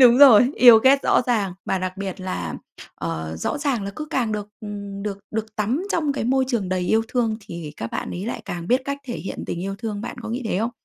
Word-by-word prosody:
đúng 245 0 +8
rồi, 255 -2 +8
yêu 240 -3 +9
ghét 270 +4 +5
rõ - - +3
ràng, 215 -6 +1
mà 190 - 0
đặc 185 +1 -4
biệt 195 -1 -5
là, 90 - -4 0.4
ờ, 80 0 -4
rõ 85 - -2
ràng 280 -7 0
là 200 - -3
cứ 305 - -5
càng 235 -6 0
được, 210 -1 -4
ừm, 200 -2 -6
được 200 -1 -4
được 220 0 -4
tắm 230 - 0
trong 305 -4 +1
cái 275 - -3
môi 265 +2 +2
trường 220 -8 -1
đầy 185 -1 0
yêu 220 +5 +2
thương 230 -3 0
thì 170 -7 -8
các 115 - -4
bạn - - -3
ấy 185 +4 -5
lại 240 - -4
càng 175 0 -5
biết 255 +2 +4
cách 280 0 -3
thể 240 - -5
hiện 190 - -6
tình 170 - -3
yêu 195 0 -3
thương. 215 -3 -4
Bạn 230 - -6
có 225 - -6
nghĩ 245 +3 -3
thế 185 - 0
không, 225 +3 0
215 Hz, 255 wpm, -23 LUFS, 190-250 Hz, 0.4 s, yêu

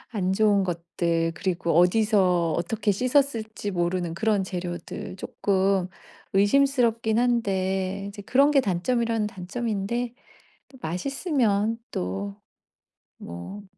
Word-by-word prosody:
안 190 -3 0
좋은 205 0 +3
것들 170 -1 -1
그리고 170 -3 -1
어디서 180 -3 +3
어떻게 205 +5 0
씻었을지 235 -3 0
모르는 175 -1 -1
그런 210 +1 +1
재료들 180 0 -5
쪼끔 195 -1 0 0.5
의심스럽긴 230 0 +3
한데 195 -5 0
이제 205 0 -9
그런 275 +8 +4
게 275 - +5
단점이라면 225 +3 0
단점인데 225 +4 -3 0.6
또 265 - -16
맛있으면 225 - 0
또 95 +2 -3 0.8
뭐 85 - -8
200 Hz, 245 characters per minute, -25 LUFS, 180-230 Hz, 0.8 s, 게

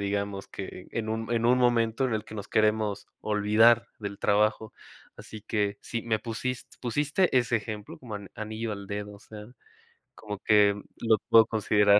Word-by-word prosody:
digamos, 100 0 -2
que 95 -1 -8
en 110 -2 -3
un 110 +1 -3
en 115 0 +1
un 125 +1 +5
momento 120 0 +2
en 120 - -1
el 110 0 -2
que - - -11
nos 105 - -6
queremos 110 -1 +1
olvidar 110 +3 +4
del 100 -1 -5
trabajo. 105 +1 +1 0.4
Así 110 -1 -10
que 105 -1 -1
sí, 115 -2 -4
me 110 -2 0
pusis 120 +2 -4 0.2
pusiste 145 +7 +1
ese 120 -1 +1
ejemplo 105 -1 -6
co - - -24
como 110 -5 -6 0.2
anillo 110 +1 -4
al 100 -1 -7
dedo, 105 0 -5
o - - -13
sea, 105 -1 -10 0.7
como 105 -2 -7
que 105 -1 +5 0.2
lo 115 -1 +3
puedo 115 -1 +8
considerar. 105 -2 +4
110 Hz, 175 wpm, -28 LUFS, 105-115 Hz, 0.7 s, puedo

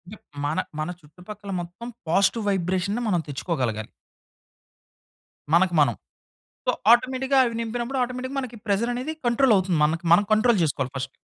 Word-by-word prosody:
ఇప్ - - -23 0.2
మన 150 +2 -1 0.2
మన 155 - -1
చుట్టుపక్కల 195 +7 -10
మొత్తం 175 +8 -9 0.2
పాజిటివ్ 200 +5 +2
వైబ్రేషన్‌ని 190 +4 0
మనం 180 -5 +1
తెచ్చుకోగలగాలి... 125 - -2 1.6
మనకు 175 +1 +4
మనం. 120 -7 +2 0.7
సో, - - +3 0.2
ఆటోమేటిక్‌గా 260 +3 +2
అవి 235 -2 -2
నింపినప్పుడు 240 +3 -3
ఆటోమేటిక్‌గా 255 +2 -4
మనకి 245 -3 -7
ప్రెషరనేది 240 +8 -1
కంట్రోలవుతుంది 215 - +3
మనకి. 165 +3 -1
మనం 205 - +4
కంట్రోల్ 220 -2 +3
చేసుకోవాలి 135 -3 -2
ఫస్ట్. 135 +1 -4
200 Hz, 130 wpm, -24 LUFS, 170-240 Hz, 1.6 s, మనకు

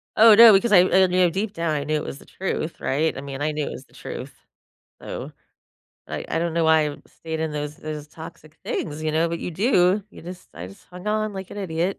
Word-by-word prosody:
Oh, 225 0 +8
no, 230 0 +10
because 210 +4 +3
I 195 - +8
I 185 +1 +4
knew 180 0 +3
deep 200 +5 -3
down, 165 -5 -1
I 145 - -2
knew 155 +1 -1
it 150 - -1
was - - -6
the - - -16
truth, 175 -3 -4
right? 155 +4 0
I - - -5
mean, 140 0 -7
I 155 +1 0
knew 150 -1 -2
it - - -5
was 130 - -9
the - - -28
truth. - - -8 0.7
So, - - -7 0.8
I - - -5
I - - -1
don't 170 0 -2
know 165 -1 +1
why 160 -1 +4
I 145 - -9
stayed 160 -1 -7
in 160 -1 -2
those 150 0 -4
those 150 -1 -7
toxic 155 0 -12
things, 155 -1 -4
you 155 -1 -1
know, 165 +2 +2
but 170 0 -3
you - - -5
do, 190 0 +2
you - - -13
just 180 +2 -10
I 85 +1 -7
just 95 - -16
hung 180 +2 -12
on 215 0 0
like 190 -1 -7
an - - -8
idiot. 180 0 -2
165 Hz, 250 wpm, -23 LUFS, 155-190 Hz, 0.8 s, no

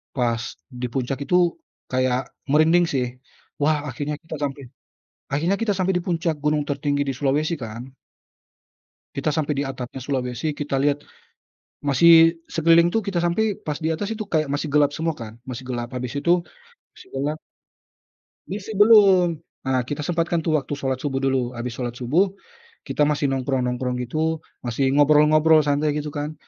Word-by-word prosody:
Pas 120 -3 0 0.4
di 125 - -1
puncak 130 0 -2
itu 180 - +1 0.6
kayak 130 -1 +1 0.3
merinding 165 +3 +5
sih. 130 -3 0 0.6
Wah, 150 +1 +3
akhirnya 145 +4 -4
kita 160 -1 -7
sampai 140 0 -3 0.7
akhirnya 170 +7 +1
kita 215 -3 +1
sampai 190 0 +1
di 180 - -4
puncak 165 -3 0
gunung 150 0 +1
tertinggi 145 0 0
di - - -1
Sulawesi 150 +4 +1
kan. 115 -2 -7 1.3
Kita 140 +3 -1
sampai 150 -1 0
di - - +1
atapnya 130 0 -6
Sulawesi 130 +2 -2
kita 145 -2 -3
lihat, 145 +1 +1 0.8
masih 165 +4 +6 0.2
sekeliling 165 +1 +5
tuh 225 - +2
kita 190 -3 -1
sampai 205 +4 +1
pas 150 -1 -2
di 160 - 0
atas 180 +7 -2
itu 215 0 -4
kayak 155 -2 +1
masih 145 +2 -2
gelap 145 -1 +4
semua 160 -1 -2
kan, 110 -1 -7 0.2
masih 125 +1 -6
gelap, 120 -1 -3
habis 125 0 -4
itu, 170 +4 +1 0.6
masih - - -16
gelap 145 +3 -2 1.1
Misi 205 +3 -5
belum, 195 -5 +6 0.2
nah 130 -1 0
kita 145 +3 -4
sempatkan 170 +1 0
tuh 155 -1 +1
waktu 145 +1 -4
Salat 135 -2 -2
Subuh 135 -1 -2
dulu. 130 -2 0
Habis 120 0 -5
Salat 120 -2 -3
Subuh, 155 +11 +1 0.5
kita 150 - 0
masih 145 -1 +1
nongkrong-nongkrong 130 -1 -1
gitu, 155 +5 -1 0.2
masih 130 +3 0
ngobrol-ngobrol 150 +2 +5
santai, 145 +1 +1
gitu 150 0 -3
kan. 145 +1 -4
145 Hz, 160 wpm, -23 LUFS, 130-165 Hz, 1.3 s, masih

